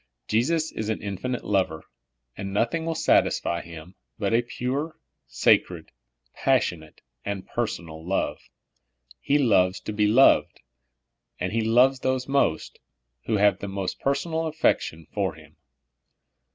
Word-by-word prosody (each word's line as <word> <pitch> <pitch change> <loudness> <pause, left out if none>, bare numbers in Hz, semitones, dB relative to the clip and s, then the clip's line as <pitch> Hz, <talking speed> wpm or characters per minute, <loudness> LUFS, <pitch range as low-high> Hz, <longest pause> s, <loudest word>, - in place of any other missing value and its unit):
Jesus 155 +9 +1
is 110 0 -4
an 110 - -1
infinite 105 +5 -4
lover, 95 -6 0 0.5
and 100 0 -5
nothing 120 +11 0
will 165 - -1
satisfy 85 - +2
Him 85 +1 -11 0.2
but - - -1
a 115 - +4
pure, 130 +6 -4 0.3
sacred, - - +1 0.4
passionate, 80 -3 -1 0.2
and 100 -2 -4
per - - -1
sonal 80 -1 -8
love. 95 +3 -1 0.8
He 145 - +2
loves 100 -8 +3
to 105 - -5
be 105 0 +2
loved. 120 +6 +4 0.8
He 105 +6 -1
loves 125 +4 +4
those 130 0 -1
most 135 - 0 0.5
who 110 - +1
have 100 -2 +3
the 100 - -5
most 95 -1 -4
personal 160 +4 -1
affection 85 - 0
for - - -1
Him. - - -17
110 Hz, 130 wpm, -25 LUFS, 95-135 Hz, 0.8 s, a